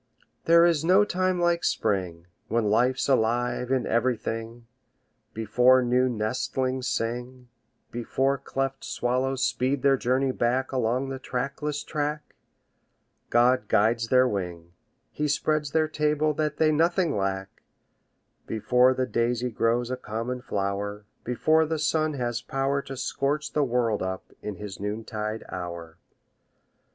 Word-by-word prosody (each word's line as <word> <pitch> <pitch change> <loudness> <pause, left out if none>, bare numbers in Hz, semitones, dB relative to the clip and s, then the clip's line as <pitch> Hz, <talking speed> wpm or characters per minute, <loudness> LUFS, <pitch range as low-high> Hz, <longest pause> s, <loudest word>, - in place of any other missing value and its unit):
There 170 +1 +6
is 165 -3 +2
no 190 +5 +5
time 185 -1 0
like 175 0 +1
Spring, 90 -6 -1 0.2
When 110 -2 +1
life's 125 +4 +2
alive 120 0 +1
in 130 -2 +1
everything, 115 -1 -2 0.7
Before 125 +4 +4
new 125 +1 +2
nestlings 130 +3 -2
sing, 125 +2 -3 0.4
Before 135 +3 0
cleft 135 0 -3
swallows 130 +2 -1
speed 130 +1 0
their 135 -1 +4
journey 130 +2 +1
back 125 +2 0
Along 130 +1 0
the 135 0 -5
trackless 140 +4 -3
track, 150 0 -3 1.0
God 120 -1 +3
guides 115 +3 +2
their 130 +1 +4
wing, 90 -6 -4 0.4
He 150 - -2
spreads 150 0 0
their 155 +2 +2
table 150 0 +1
that 150 0 -2
they 155 -1 +3
nothing 170 +1 +2
lack, 95 -1 -3 0.9
Before 125 +4 +3
the 130 - 0
daisy 120 +1 -1
grows 115 +2 0
a 130 - -2
common 125 +2 -4
flower, 100 -1 -3 0.2
Before 155 +6 +2
the 160 +1 -1
sun 155 0 0
has 120 -2 -2
power 135 +1 -1
To 135 -1 -8
scorch 145 +4 -2
the 150 - +2
world 120 -4 0
up 95 0 -4
in 105 -1 -5
his 105 -1 -8
noontide 110 +1 -4
hour. 85 -2 -7
125 Hz, 130 wpm, -26 LUFS, 115-140 Hz, 1.0 s, There